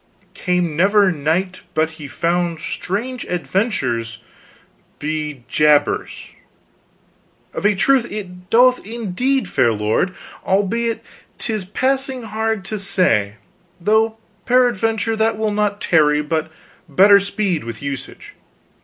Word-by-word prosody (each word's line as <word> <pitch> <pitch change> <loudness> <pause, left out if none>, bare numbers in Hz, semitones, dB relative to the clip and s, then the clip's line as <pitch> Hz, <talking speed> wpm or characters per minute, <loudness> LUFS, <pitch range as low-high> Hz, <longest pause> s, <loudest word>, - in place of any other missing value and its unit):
"came 180 -4 -1
never 200 +3 +4
knight 170 +4 -1 0.2
but 155 0 +1
he 155 -2 -9
found 170 +2 -1
strange 230 +10 -4
adventures, 135 - -1 0.8
be 150 -3 -4
jabers. 150 -1 +1 1.2
Of - - -4
a 210 - +2
truth 255 +4 +2
it 180 -3 -8
doth 250 +2 +4
indeed, 235 +3 -1
fair 120 -8 +2
lord, 110 - 0 0.3
albeit 225 +4 0 0.3
'tis 215 -5 -1
passing 265 +4 -1
hard 220 -2 -2
to 215 +1 -4
say, 115 - +1 0.4
though 220 +4 +2 0.3
peradventure 225 -3 +2
that 220 0 +1
will 220 -1 0
not 205 0 0
tarry 150 -4 +3
but 155 +1 -2 0.4
better 200 +7 +6
speed 200 -4 -1
with 115 +3 -7
usage. 140 -2 -6
190 Hz, 110 wpm, -19 LUFS, 155-220 Hz, 1.2 s, better